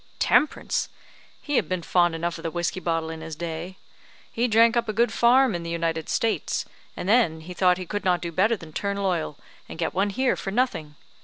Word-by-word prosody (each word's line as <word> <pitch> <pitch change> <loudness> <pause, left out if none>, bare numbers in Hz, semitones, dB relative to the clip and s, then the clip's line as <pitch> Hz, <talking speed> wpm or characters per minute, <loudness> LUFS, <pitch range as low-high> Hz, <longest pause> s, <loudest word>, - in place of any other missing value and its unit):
"Temperance! 305 - +1 0.5
He 290 -3 0
had - - 0
been 185 -2 -2
fond 175 -1 +2
enough 170 +1 -3
of - - -8
the 165 - -3
whiskey 175 +2 -2
bottle 165 -2 -1
in 160 0 -7
his 160 -1 -6
day. 170 +3 -6 0.5
He 235 +2 0
drank 230 +1 +5
up 235 -2 0
a - - -1
good 235 +1 +2
farm 250 0 +4
in 175 - -3
the 170 - -6
United 165 -1 -2
States, 225 -1 0 0.3
and - - -4
then 200 -8 +3
he 180 +3 -8
thought 180 0 +3
he 185 - -5
could 205 +4 -4
not 180 -2 +2
do 170 -1 -5
better 205 +7 +2
than 160 -4 -12
turn 200 +3 -2
loyal, 175 -7 -1 0.3
and - - -8
get 165 - -2
one 195 +3 +1
here 255 +5 +1
for - - -5
nothing. 195 -10 -1
180 Hz, 220 wpm, -25 LUFS, 165-220 Hz, 0.5 s, drank